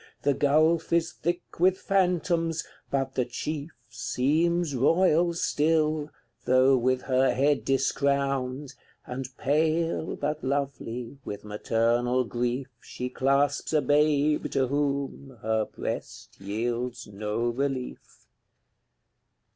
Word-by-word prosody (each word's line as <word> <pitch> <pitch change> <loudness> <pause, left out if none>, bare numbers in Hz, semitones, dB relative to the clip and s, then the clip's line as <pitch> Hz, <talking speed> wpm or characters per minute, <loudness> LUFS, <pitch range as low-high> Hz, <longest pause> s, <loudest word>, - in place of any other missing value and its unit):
The 145 - +3
gulf 155 +4 +2
is 165 -1 +2
thick 175 0 -4
with 185 +2 +4
phantoms, 175 -4 +1 0.3
but 135 -1 -1
the 125 - +1
chief 145 +5 -4 0.2
Seems 150 +6 0
royal 170 +5 +3
still, 155 -1 +1 0.4
though 130 +1 +5
with 130 +1 +1
her 130 -1 +2
head 140 +3 +2
discrowned, 135 0 0 0.3
And 130 0 -5
pale, 160 +3 0
but 150 +1 -3
lovely, 135 -2 -3
with 100 0 -6
maternal 115 +4 +1
grief 125 +2 -2 0.2
She 125 0 -5
clasps 140 +4 +1
a 155 - +4
babe, 150 +1 +2
to 130 -2 +1
whom 140 -2 -2
her 110 0 +1
breast - - -6
yields 120 +4 -3
no 105 +3 -2
relief. 130 +1 -4
140 Hz, 105 wpm, -27 LUFS, 125-155 Hz, 0.4 s, though